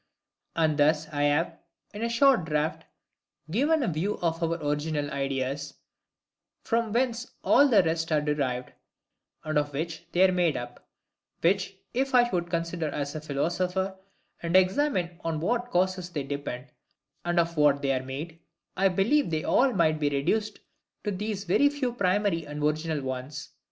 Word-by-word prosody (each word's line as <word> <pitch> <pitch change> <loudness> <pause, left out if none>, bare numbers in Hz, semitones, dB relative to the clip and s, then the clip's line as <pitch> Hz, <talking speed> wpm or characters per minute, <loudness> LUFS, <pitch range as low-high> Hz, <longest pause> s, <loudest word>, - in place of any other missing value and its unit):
And 155 -2 +1
thus 150 +1 +3
I 145 -1 0
have, 165 +3 +1 0.3
in 205 - -6
a 235 - 0
short 240 - +4
draught, 150 0 -1 0.7
given 290 - +2
a - - 0
view 175 +5 -1
of 165 0 0
OUR 165 0 0
ORIGINAL 150 -1 -2
IDEAS, 140 +1 -2 0.9
from 230 -1 0
whence 240 +1 0
all 285 - +6
the 215 -8 +5
rest 165 0 -1
are 155 - +4
derived, 140 -4 -1 0.7
and 155 -1 +1
of 145 -1 -3
which 160 +3 -4
they 185 +2 +5
are - - +1
made 175 -5 +1
up; 120 0 -8 0.6
which, 190 +2 +1 0.2
if 265 +1 0
I 240 -1 +6
would 175 -1 -1
consider 170 -1 -2
as 145 0 -3
a 155 - -5
philosopher, 180 +6 -1 0.5
and 170 +1 -1
examine 185 - +2
on 165 -2 -1
what 240 +8 -1
causes 185 -1 0
they 150 -5 -3
depend, 135 -2 -5 0.5
and 175 0 +1
of 170 0 +1
what 145 -2 +3
they 135 -1 +2
are 130 0 -1
made, 150 +5 -6 0.4
I 195 +1 +3
believe 200 +10 +2
they 160 -1 -1
all 260 +6 +3
might 160 -7 +2
be 145 -1 +2
reduced 205 +10 -1 0.4
to 210 - -1
these 205 +1 -3
very 205 +10 +4
few 280 -4 -2
primary 190 -6 +1
and 150 0 -5
original 155 0 0
ones, 130 +3 -5
viz. - - -34
165 Hz, 165 wpm, -27 LUFS, 150-195 Hz, 0.9 s, all